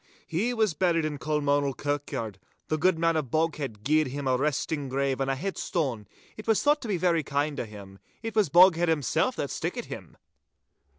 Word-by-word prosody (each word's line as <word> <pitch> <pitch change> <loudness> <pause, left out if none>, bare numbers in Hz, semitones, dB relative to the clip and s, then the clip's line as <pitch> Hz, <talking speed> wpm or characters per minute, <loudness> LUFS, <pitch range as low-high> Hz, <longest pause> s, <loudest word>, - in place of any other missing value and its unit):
He 195 +9 -1
was 220 -6 +1
buried 165 -1 +1
in 150 -2 -3
Colmonel 145 -2 +1
kirkyaird. 140 -8 -3 0.3
The 155 - 0
good 185 +1 +3
man 165 0 +2
of 155 -2 0
Boghead 150 -8 -1
gied 155 +2 +3
him 140 +1 -4
a 130 - +3
resting 145 +1 -1
grave 135 0 0
and 135 - 0
a 135 - +1
headstone. 140 - -2 0.3
It 215 - -9
was 220 -2 +3
thought 295 0 +3
to 240 - -6
be 200 -4 0
very 170 -2 +2
kind 145 0 -1
o' - - -2
him. 100 -2 -12 0.2
It 225 -1 -4
was 210 -7 +3
Boghead 175 +1 +6
himsel' 155 -6 +2
that - - -3
stickit - - -3
him. - - -9
150 Hz, 190 wpm, -27 LUFS, 135-170 Hz, 0.3 s, Boghead